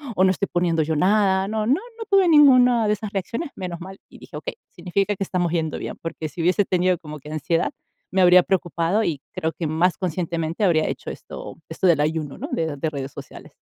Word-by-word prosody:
o 185 - +3
no 185 - +5
estoy 200 +1 -1
poniendo 170 -2 +1
yo 160 +1 -1
nada", 190 +2 +3
no 215 -1 -1
no 250 - +3 0.2
no 450 - -5
tuve 390 -2 +5
ninguna 250 -7 +6
de 210 - +3
esas 210 0 -5
reacciones, 230 - -3
menos 180 -2 -6
mal. 190 +1 -9
Y - - -15
dije: - - -10
"Okey, - - -6
significa 195 +3 -1
que 195 - -1
estamos 175 -3 -1
yendo 160 -3 -1
bien", - - -6
porque 165 -2 -5
si 170 - -6
hubiese 180 +4 +3
tenido 180 0 +1
como 150 -3 -9
que 150 +2 -12
ansiedad 155 +2 0 0.4
me 190 - +3
habría 180 0 +7
preocupado 175 +2 0
y 145 -4 -2
creo 160 0 -3
que 165 - -3
más 165 +3 +1
conscientemente 170 0 -2
habría 160 -3 +3
hecho - - -5
esto - - -9
esto 165 +3 0
del 160 -4 +4
ayuno, 155 -2 -2
¿no? - - -6
De 160 -3 -1
de 155 +3 -1
redes 140 -2 -5
sociales. - - -11
180 Hz, 220 wpm, -23 LUFS, 160-195 Hz, 0.4 s, habría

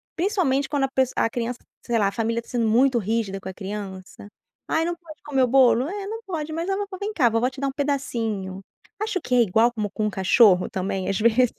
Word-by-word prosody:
principalmente 330 -8 +1
quando 285 -2 +1
a - - -4
pes 260 -1 +2
a - - +2
criança, 240 +1 -3 0.3
sei 235 -2 +1
lá, 200 - +3
a - - -1
família 230 +1 -1
tá - - -25
sendo 235 -2 0
muito 250 +3 +4
rígida 210 -2 -2
com - - -10
a 190 - -7
criança, 195 -1 -7 0.4
"Ai, 320 - +1
não 345 - -2
pode 335 -3 -14
comer 270 -3 +1
o - - +3
bolo", 255 0 +4
"É, 395 +3 -5
não 450 +2 -5
pode", 320 -5 -4
"Mas 330 +2 -3
a 390 - +1
vovó 400 -1 -4
vem 415 +1 -3
cá, 255 - +3
vovó 230 +3 +1
te 260 +1 -10
dá 275 - +1
um 270 - -1
pedacinho". 230 -10 -2 0.4
Acho 430 -3 -1
que 250 - -1
é 245 - +6
igual 225 +3 +3
como 210 -3 -2
com 215 +1 -2
um - - +1
cachorro 190 -1 +4
também, 190 0 -3
às 195 - 0
vezes, 235 +2 +3
245 Hz, 245 wpm, -24 LUFS, 210-295 Hz, 0.4 s, é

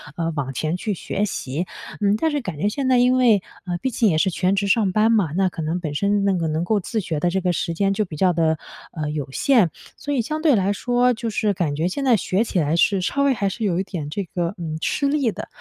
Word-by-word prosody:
呃， 165 -1 -1
往 135 -3 -2
前 155 +7 -2
去 210 +2 -2
学 200 +4 -2
习。 165 -3 -3 0.3
嗯， 205 0 +3
但 320 +6 +1
是 290 - -1
感 185 - -6
觉 200 +8 +1
现 260 +4 -2
在 255 - +5
因 250 +1 +4
为 235 -7 +4 0.2
呃， 175 -1 -1
毕 260 - -2
竟 225 -2 +2
也 155 - +1
是 190 +4 +2
全 185 +3 +1
职 200 0 0
上 200 -1 +3
班 215 +4 +3
嘛， 200 -9 +2
那 190 0 +3
可 165 - -6
能 160 +3 -1
本 155 -4 -4
身 200 +5 +1
那 195 - +3
个 170 -3 -1
能 155 +1 -1
够 210 +3 +1
自 220 +4 -3
学 160 -6 -3
的 175 - +1
这 190 +2 0
个 180 -1 +1
时 170 0 -2
间 195 +2 +1
就 215 - 0
比 160 - -8
较 180 +3 +3
地， 160 -1 +1 0.4
呃， 150 -3 -3
有 150 -2 -4
限， 230 - +3 0.3
所 290 - -5
以 255 - +2
相 310 +6 -3
对 305 -6 +4
来 195 0 +1
说 245 +4 0
就 235 -1 -3
是 210 -1 0
感 160 -6 -1
觉 160 +4 0
现 275 +9 -3
在 245 -3 +5
学 195 +2 0
起 185 - -1
来 150 +1 +1
是 195 +1 +3
稍 280 +9 0
微 280 -1 +4
还 200 -4 -1
是 225 +3 -5
有 175 -3 +1
一 190 - 0
点 160 -7 -5
这 200 +6 -3
个， 175 0 -2
呃， 160 -2 -4
吃 280 - 0
力 280 -5 +1
的。 - - -7
195 Hz, 295 characters per minute, -22 LUFS, 165-225 Hz, 0.4 s, 在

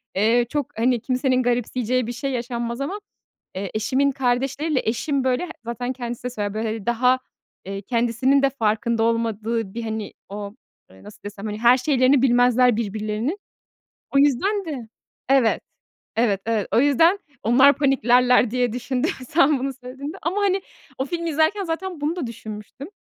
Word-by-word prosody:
eee, 225 +5 +3
çok, 290 -5 -3
hani, 240 0 +2
kimsenin 255 0 +1
garipseyeceği 245 0 0
bir - - -3
şey 255 +3 -3
yaşanmaz. 235 0 -3
Ama, 370 +9 -3 0.6
eee, 190 0 -4
eşimin 260 +6 +1
kardeşleriyle 270 +3 0
eşim 270 +5 -1
böyle 260 +7 0 0.2
zaten 245 +2 -3
kendisi 240 -2 -6
de 250 - -2
söyler 205 -4 -3
böyle, 220 +1 -2
hani, 220 -2 -4
daha, 250 +2 +3 0.5
eee, 195 +1 -5
kendisinin 240 +5 +1
de 275 - +3
farkında 230 -2 0
olmadığı 225 -2 -1
bir, 235 - -4
hani, 220 -1 -4 0.2
o, 205 +1 -7 0.3
eee, 95 +1 -18
nasıl 210 - -14
desem, 205 0 -8
hani 210 0 -4
her 240 +2 +6
şeylerini 260 0 +3
bilmezler 245 -1 +4
birbirlerinin. 215 - -2 0.8
O - - +5
yüzden 370 - +2
de 270 -9 -6 0.4
Evet. 265 -4 +3 0.6
Evet, 215 -4 +2
evet. 225 -3 0
O - - +5
yüzden 325 +7 +4 0.2
onlar 260 +6 +6
paniklerler 250 -3 +4
diye 245 -1 0
düşündüm 250 +1 -1 0.2
sen 300 -3 +3
bunu 270 +1 -2
söylediğinde. 275 +6 -7
Ama, 375 +5 -1
hani, 390 -1 +2 0.4
o 265 - 0
filmi 335 +2 -3
izlerken 320 +7 +1
zaten 345 0 -4
bunu 310 +4 0
da 330 -8 -3
düşünmüştüm. 220 +4 -8
245 Hz, 160 wpm, -23 LUFS, 225-275 Hz, 0.8 s, her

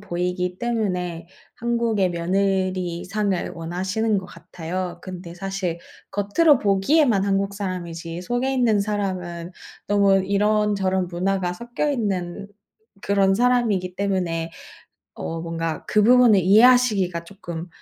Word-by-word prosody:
보이기 180 -1 -2
때문에 180 -8 -2 0.3
한국의 230 -5 0
며느리 185 0 -1
상을 200 -2 -1
원하시는 190 +6 -1
것 185 - -7
같아요. 175 +1 -6
근데 180 -2 -8
사실 190 -2 -3 0.3
겉으로 235 +9 +3
보기에만 200 +2 +3
한국 200 0 0
사람이지 175 -3 -5
속에 245 +6 -1
있는 230 -5 +2
사람은 185 -4 -3 0.4
너무 200 -1 +4
이런저런 200 -2 +1
문화가 180 0 -1
섞여 240 +8 -2
있는 200 -5 -2 0.5
그런 195 -1 +3
사람이기 220 -6 +1
때문에 180 -5 -1 0.7
어, 165 0 -5
뭔가 165 -1 -4
그 210 - +3
부분을 240 -3 +6
이해하시기가 205 -4 +4
쪼끔 175 -3 -8
195 Hz, 280 characters per minute, -23 LUFS, 180-210 Hz, 0.7 s, 부분을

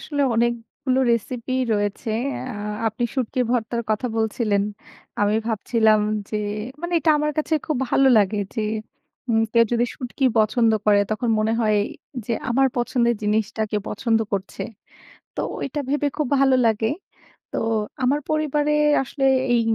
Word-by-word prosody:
আসলে 285 -2 -1
অনেকগুলো 235 +3 -1
রেসিপি 235 +2 -2 0.2
রয়েছে। 205 +2 -1 0.4
আ - - -7 0.3
আপনি 225 +2 -1
শুটকি 255 -1 -1
ভর্তার 235 -1 0
কথা 215 +4 0
বলছিলেন। 215 -2 +1 0.6
আমি 205 +1 +3
ভাবছিলাম 220 -1 +2 0.3
যে 215 - -1 0.4
মানে, 345 0 -4
এটা 320 - +2
আমার 300 0 0
কাছে 310 +1 +1
খুব 310 - 0
ভালো 270 - +4
লাগে। 205 +1 +1 0.2
যে, 225 - -1 0.7
উম 225 -1 +3
কেউ 230 -1 +6
যদি 240 0 +3
শুঁটকি 260 0 -4
পছন্দ 220 +1 +3 0.2
করে, 205 -1 +5
তখন 230 +2 -1
মনে 215 +1 +1
হয় 215 -1 +2 0.5
যে 235 - -1 0.2
আমার 270 +3 +4
পছন্দের 240 -1 +1
জিনিসটা 215 +1 0
কেউ 210 -1 0
পছন্দ 225 +1 +1
করছে। 195 -1 -3 0.7
তো - - -2 0.2
ওইটা 285 +2 -3
ভেবে 290 0 +1
খুব 300 -4 0
ভালো 270 -1 +5
লাগে। 220 0 +2 0.6
তো - - -3 0.5
আমার 280 +4 +2
পরিবারে 300 -1 +1 0.3
আসলে 270 +1 -2 0.3
এই 235 - +4
235 Hz, 145 wpm, -23 LUFS, 215-265 Hz, 0.7 s, কেউ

